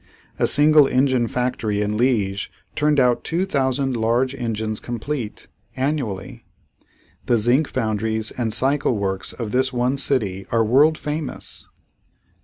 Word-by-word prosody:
A - - +3
single 150 0 +6
engine 130 -2 +2
factory 115 -4 -1
in 105 0 -1
Liege 105 -5 0 0.2
turned 150 -1 +2
out 125 -2 +2
two 175 +3 -1
thousand 135 -5 0
large 120 +3 +1
engines 110 -4 -3
complete, 120 0 -5 0.3
annually. 130 -4 -3 0.8
The 120 - +3
zinc 125 +7 +3
foundries 110 0 -2
and 115 -3 -2
cycle 135 +1 +1
works 95 -1 -2
of 115 -4 -6
this 130 +1 +1
one 125 +2 0
city 105 -9 -1
are 115 -1 +3
world 145 +7 +4
famous. 150 -1 -5
125 Hz, 130 wpm, -21 LUFS, 110-135 Hz, 0.8 s, single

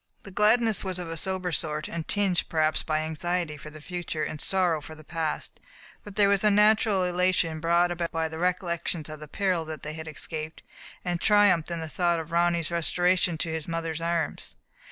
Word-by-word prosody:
The 200 - -10
gladness 215 +2 +3
was 185 -2 -3
of 175 -2 -5
a - - -3
sober 185 +1 -1
sort, 155 -1 -2
and 165 -2 -5
tinged, 195 -3 +1
perhaps, 155 -1 +2
by 155 -1 -1
anxiety 160 +1 -2
for 150 +1 -10
the 155 0 -11
future 175 0 -4
and 155 - -4
sorrow 180 -5 +1
for 155 +2 -10
the 155 - -14
past; 160 -1 -3 0.4
but 205 -2 -11
there 205 -1 +5
was 200 0 +3
a 210 - +5
natural 210 -1 +4
elation, 180 -2 +1
brought 170 +2 +3
about 170 -1 -2
by 165 0 0
the 160 0 -7
recollections 170 -3 -1
of 155 -1 -7
the 150 - -9
peril 185 0 0
that 155 -1 -7
they 150 - -4
had 160 0 -7
escaped, 155 +1 -5 0.4
and 175 -1 -1
triumph 205 -6 +4
in 170 -1 -3
the 160 - -4
thought 170 +1 +1
of 160 +1 -7
Ronny's 170 -1 +2
restoration 175 +1 +2
to 165 - -2
his 160 -2 -4
mother's 165 -1 -3
arms. 170 -2 -2
170 Hz, 200 wpm, -27 LUFS, 160-185 Hz, 0.4 s, there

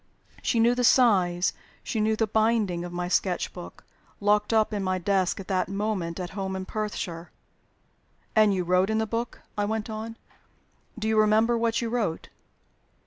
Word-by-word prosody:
She 230 - +1
knew 235 +2 +5
the 245 0 -1
size, 190 -8 +4 0.3
she 225 - -3
knew 215 +1 +2
the 225 - +1
binding, 215 -5 +1
of 175 - -6
my 175 0 -3
sketch 180 0 0
book 175 - -10 0.4
locked 210 +1 +2
up 220 -1 +2
in 205 -2 -2
my 185 0 0
desk, 190 0 0
at 195 - -8
that 185 -1 0
moment, 195 -4 -2
at 180 -1 -5
home 190 -1 -4
in 190 0 -4
Perthshire! 190 -5 -4 1.1
"And 215 -1 +5
you 185 -2 0
wrote 180 +3 +2
in 220 - +1
the 220 - +1
book," 230 +2 -4
I 205 - 0
went 220 +1 -3
on. 220 +1 -6 0.8
"Do 220 0 -3
you 220 0 +3
remember 215 +2 +4
what 230 0 0
you 230 - -2
wrote?" 220 -9 -2
210 Hz, 180 wpm, -26 LUFS, 185-220 Hz, 1.1 s, knew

